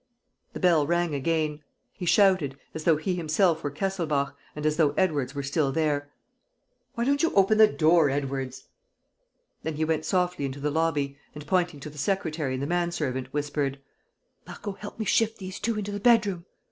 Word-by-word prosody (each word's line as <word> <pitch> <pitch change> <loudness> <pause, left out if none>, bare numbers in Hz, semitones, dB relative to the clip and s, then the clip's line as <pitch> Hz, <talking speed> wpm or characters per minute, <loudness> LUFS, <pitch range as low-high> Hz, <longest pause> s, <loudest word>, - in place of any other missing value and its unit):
The - - -6
bell 165 -6 +3
rang 175 -1 +1
again. 150 +1 -1 0.3
He 180 - -6
shouted, 185 -9 +3 0.2
as 160 -1 -6
though 165 -3 +5
he 170 +5 -2
himself 165 0 +1
were 145 - -1
Kesselbach 155 -4 -1 0.2
and 150 0 -5
as 155 0 +2
though 150 -4 +3
Edwards 145 -7 +1
were 140 - -3
still 140 0 0
there: 145 -1 0 0.9
"Why 235 - -1
don't 280 +2 +2
you 330 - +2
open 200 +2 +4
the 215 - +9
door, 160 -4 +4
Edwards?" 135 -2 -3 1.0
Then 160 -1 -3
he 155 +1 0
went 155 -1 -1
softly 180 -5 0
into 135 +1 -5
the 145 +1 -1
lobby 145 -3 0 0.2
and, 150 0 -8
pointing 175 -2 0
to 150 - -6
the 150 - -11
secretary 155 -6 -1
and 130 - -3
the - - 0
manservant, 160 -6 -1
whispered: 145 -2 -2 0.7
"Marco, 205 - -6
help 205 +1 -9
me 220 - -3
shift 225 +1 +2
these 185 -1 -7
two 225 0 -1
into 205 -1 -3
the 205 - -4
bedroom. 205 -6 +3
160 Hz, 185 wpm, -27 LUFS, 145-185 Hz, 1.0 s, the